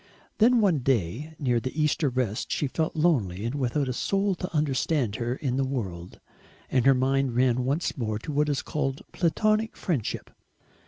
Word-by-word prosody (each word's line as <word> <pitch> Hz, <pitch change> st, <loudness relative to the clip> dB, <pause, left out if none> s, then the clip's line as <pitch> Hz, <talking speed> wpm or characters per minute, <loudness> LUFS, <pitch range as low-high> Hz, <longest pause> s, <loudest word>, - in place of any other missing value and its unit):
Then 235 Hz, +2 st, +5 dB
one 185 Hz, -8 st, +3 dB
day 130 Hz, -, -1 dB
near 125 Hz, -4 st, +1 dB
the 130 Hz, +6 st, -5 dB
Easter 150 Hz, -1 st, +2 dB
rest 125 Hz, -4 st, -2 dB
she -, -, 0 dB
felt 155 Hz, +4 st, -2 dB
lonely 115 Hz, -, +1 dB
and 120 Hz, -, -2 dB
without 140 Hz, 0 st, 0 dB
a 130 Hz, -, -1 dB
soul 195 Hz, +9 st, 0 dB
to 180 Hz, +1 st, -5 dB
understand 145 Hz, -6 st, 0 dB
her 120 Hz, +1 st, -2 dB
in 130 Hz, -2 st, -2 dB
the 135 Hz, -, +2 dB
world, 95 Hz, -10 st, -4 dB, 0.5 s
and 130 Hz, 0 st, +3 dB
her 135 Hz, -, +7 dB
mind 135 Hz, -1 st, +1 dB
ran 125 Hz, 0 st, +2 dB
once 145 Hz, +6 st, -1 dB
more 110 Hz, -5 st, -2 dB
on 150 Hz, -, -3 dB
what 150 Hz, +1 st, +2 dB
is 140 Hz, -2 st, -1 dB
called 135 Hz, -3 st, -2 dB
Platonic 215 Hz, +6 st, +1 dB
friendship. 150 Hz, -, -2 dB
135 Hz, 175 wpm, -27 LUFS, 120-155 Hz, 0.5 s, her